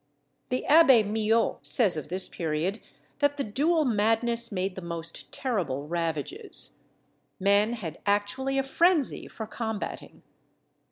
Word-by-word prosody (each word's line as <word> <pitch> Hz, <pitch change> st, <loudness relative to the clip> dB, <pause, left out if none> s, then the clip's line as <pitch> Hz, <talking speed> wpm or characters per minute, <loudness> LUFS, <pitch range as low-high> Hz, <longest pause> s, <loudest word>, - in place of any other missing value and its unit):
The 255 Hz, -, -2 dB
Abbé 275 Hz, -8 st, +6 dB
Millot 220 Hz, +2 st, +1 dB
says 210 Hz, -9 st, +3 dB
of 155 Hz, -1 st, -6 dB
this 185 Hz, +2 st, +2 dB
period, 165 Hz, +5 st, -3 dB, 0.4 s
that 285 Hz, 0 st, +1 dB
the 280 Hz, -, -1 dB
duel 300 Hz, +9 st, +1 dB
madness 230 Hz, +1 st, +2 dB
made 190 Hz, -1 st, -2 dB
the 190 Hz, -, -8 dB
most 170 Hz, -1 st, -6 dB
terrible 170 Hz, -, -3 dB
ravages. 165 Hz, -3 st, -3 dB, 0.6 s
Men 200 Hz, +4 st, +3 dB
had 185 Hz, -10 st, -6 dB
actually 230 Hz, +7 st, 0 dB
a 270 Hz, -, +2 dB
frenzy 325 Hz, +2 st, +2 dB
for 220 Hz, -, -7 dB
combating. 220 Hz, -1 st, -6 dB
215 Hz, 125 wpm, -27 LUFS, 180-255 Hz, 0.6 s, Abbé